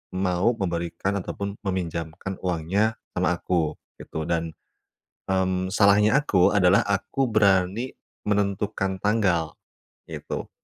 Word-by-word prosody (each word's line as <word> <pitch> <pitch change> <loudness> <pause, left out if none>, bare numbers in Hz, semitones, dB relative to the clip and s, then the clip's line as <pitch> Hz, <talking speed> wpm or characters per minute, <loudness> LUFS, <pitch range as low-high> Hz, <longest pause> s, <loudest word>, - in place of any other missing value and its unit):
mau 95 +5 +1
memberikan 85 +1 -2
ataupun 100 +2 -5
meminjamkan 90 -1 -4
uangnya 95 +5 0 0.2
sama 90 0 +1
aku 85 -3 0 0.2
gitu. 80 - -5
Dan, 80 -1 -2 0.8
mmm, 95 0 0
salahnya 105 +4 +5
aku 95 -11 +3
adalah 95 -1 +5
aku 105 +6 -1
berani 100 +2 +2 0.3
menentukan 100 -1 0
tanggal, 95 -7 +1 0.6
gitu. - - -5
95 Hz, 100 wpm, -25 LUFS, 90-105 Hz, 0.8 s, salahnya